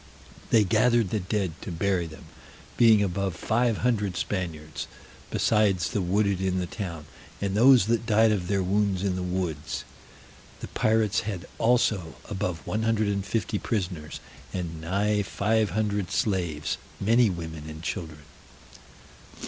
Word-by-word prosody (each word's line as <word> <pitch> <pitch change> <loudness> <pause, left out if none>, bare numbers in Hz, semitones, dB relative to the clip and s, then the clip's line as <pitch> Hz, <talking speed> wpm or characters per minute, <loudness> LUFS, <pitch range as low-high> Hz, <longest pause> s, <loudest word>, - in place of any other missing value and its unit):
They 110 -2 +5
gathered 110 +1 +3
the 110 - +1
dead 95 -1 -1
to - - -6
bury 90 0 0
them, 80 -1 -12 0.5
being 110 -3 +6
above 95 -1 -1
five 115 -1 +1
hundred 105 -7 +1
Spaniards, 80 -6 -4 0.4
besides 100 -6 +2
the 105 - 0
wounded 100 +1 +1
in 95 -1 0
the 90 - -1
town, 85 -4 -6 0.3
and 100 -1 -1
those 125 -1 +7
that 115 +1 0
died 110 0 +5
of 95 -4 -1
their 100 0 +1
wounds 100 0 +1
in 95 -2 0
the 90 - -3
woods. 90 -5 -3 0.8
The - - -7
pirates 110 -1 +2
had 100 -5 -4
also 110 - +2
above 90 -5 -3
one 110 - -1
hundred 110 -2 +1
and 100 -1 -1
fifty 105 0 -1
prisoners, 90 -8 -3 0.3
and 85 -3 -4
nigh 100 +5 +1
five 105 +2 +1
hundred 105 0 -1
slaves, 85 -8 -1 0.2
many 115 +2 +4
women 80 -3 -6
and 80 +1 -9
children. 80 -4 -5
100 Hz, 145 wpm, -27 LUFS, 90-110 Hz, 0.8 s, those